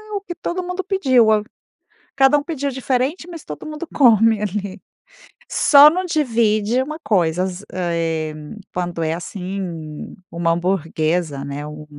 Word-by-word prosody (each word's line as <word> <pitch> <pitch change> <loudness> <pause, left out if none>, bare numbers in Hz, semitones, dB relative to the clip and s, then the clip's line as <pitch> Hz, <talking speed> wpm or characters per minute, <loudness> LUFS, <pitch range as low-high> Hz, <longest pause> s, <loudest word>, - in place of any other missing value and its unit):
o 400 - -2
que 375 -3 -7
todo 350 +1 -4
mundo 360 +1 -4
pediu. 270 - +3 0.9
Cada 270 +2 +5
um 290 - -7
pediu 285 -4 -3
diferente, 265 +6 -1
mas 335 -3 -9
todo 150 - -8
mundo 310 +2 -6
come 225 -5 +5
ali. 200 -1 -4 0.7
Só 290 0 +7
não 365 +4 -2
divide 235 - +1
uma 305 +4 -5
coisa, 180 -3 +1
za 190 +2 -6
eh, 165 -3 -2 0.4
quando 175 -2 -3
é 160 0 0
assim 185 +3 -5
um 160 -4 -7 0.2
uma 170 0 0
hamburguesa, 165 -4 -1
né, 140 +1 -5
um 150 0 -9
210 Hz, 145 wpm, -20 LUFS, -, 0.9 s, Só